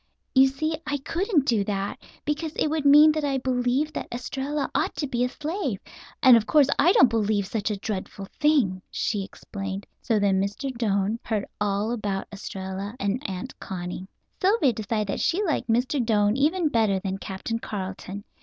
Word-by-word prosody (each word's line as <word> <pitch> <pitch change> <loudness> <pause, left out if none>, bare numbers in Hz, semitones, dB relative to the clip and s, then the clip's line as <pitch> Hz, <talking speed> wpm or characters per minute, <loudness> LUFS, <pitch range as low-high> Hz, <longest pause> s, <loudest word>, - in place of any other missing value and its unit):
"You 265 0 +7
see 310 +4 -2
I 290 -1 0
couldn't 330 - 0
do 225 -6 +2
that, 200 -1 -3 0.3
because 300 +2 -2
it - - +1
would 310 -1 -1
mean 295 +2 +8
that 305 0 -2
I 275 -2 +1
believed 260 +3 0
that - - -4
Estralla 270 +4 -3
ought - - 0
to 295 - -2
be 245 -3 -1
a 250 - +1
slave, 300 - -3 0.4
and 255 -2 +9
of 225 -1 +2
course 295 -2 +5
I 340 +5 +6
don't 430 - +7
believe 215 -3 +1
such 205 +2 -2
a 210 - -2
dreadful 195 -1 -5
thing," 275 -12 +3
she 205 -2 -1
explained. 195 0 -6 0.2
So 225 - +1
then 195 -2 +2
Mr. 215 +7 -3
Doane 210 -1 0
heard 215 -3 -2
all 205 +2 0
about 205 -5 -2
Estralla 195 +1 -6
and 205 +3 -1
Aunt 195 +8 -6
Connie. 180 0 -6 0.3
Sylvia 370 - +3
decided 215 0 -2
that - - -1
she 365 +4 +1
liked 315 - -1
Mr. 250 +4 +1
Doane 210 -2 +2
even 310 +4 +2
better 220 -6 +2
than 195 0 -4
Captain 195 +5 -4
Carleton. 195 -1 -6
230 Hz, 180 wpm, -25 LUFS, 200-285 Hz, 0.4 s, and